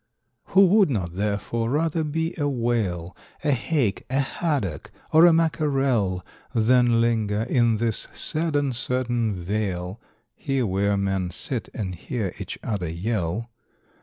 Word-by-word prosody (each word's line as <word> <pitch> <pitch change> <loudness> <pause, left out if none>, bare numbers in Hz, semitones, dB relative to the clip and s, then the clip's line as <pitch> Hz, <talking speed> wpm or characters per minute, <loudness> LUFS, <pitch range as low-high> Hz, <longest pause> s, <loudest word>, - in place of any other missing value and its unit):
= - - -50
Who 195 +1 +8
would 195 -1 +5
not 95 -10 -2
therefore 105 +4 -1
rather 160 +3 0
be 160 +2 -2
a 145 -1 +1
Whale, 110 -9 -1 0.3
A 150 - +2
Hake, 130 -4 0
a 135 +2 +1
Haddock, 135 - -2 0.2
or 160 +2 +8
a - - +7
Mackerel, 135 - +1 0.3
Than 120 0 +4
linger 110 -2 +1
in 120 -2 +2
this 115 -1 0
sad 160 -1 +1
uncertain 125 -5 0
vale 95 +1 -3 0.3
(Here 135 -3 -1
where 100 +1 +1
men 95 -2 -1
sit 120 +6 -4
and 95 -4 -3
hear 95 +2 -4
each - - -6
other 100 -7 -2
yell)? 100 +4 -2
115 Hz, 135 wpm, -24 LUFS, 100-140 Hz, 0.3 s, Who